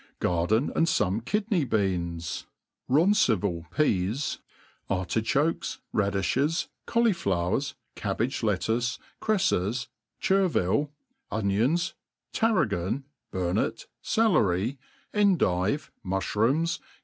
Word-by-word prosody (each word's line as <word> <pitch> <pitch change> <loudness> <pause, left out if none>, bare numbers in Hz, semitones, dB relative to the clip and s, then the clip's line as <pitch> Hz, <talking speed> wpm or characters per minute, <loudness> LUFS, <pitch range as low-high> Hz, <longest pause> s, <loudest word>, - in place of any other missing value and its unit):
Garden 90 - +1
and 165 - +3
foane. 105 - +1
kidney 205 - +1
oWans^^roncival 95 - 0
peas, 110 - 0 0.5
arti 95 +3 0
chokes, 145 +8 0 0.2
radiflies, 105 - +1 0.2
cauliflowers^ 135 - +1 0.2
cabbage 110 +5 -1
lettuce, 110 +4 0 0.2
crefles, 130 - +1 0.3
ther 195 0 +3
vile, 145 - +1 0.4
onions, 115 - +1 0.4
terragon, 125 - +1 0.3
burnet, 90 -1 -1 0.2
celery, 120 - +2 0.3
endive, 150 - +2
mufhroomf. 115 - +1
115 Hz, 75 wpm, -27 LUFS, -, 0.5 s, and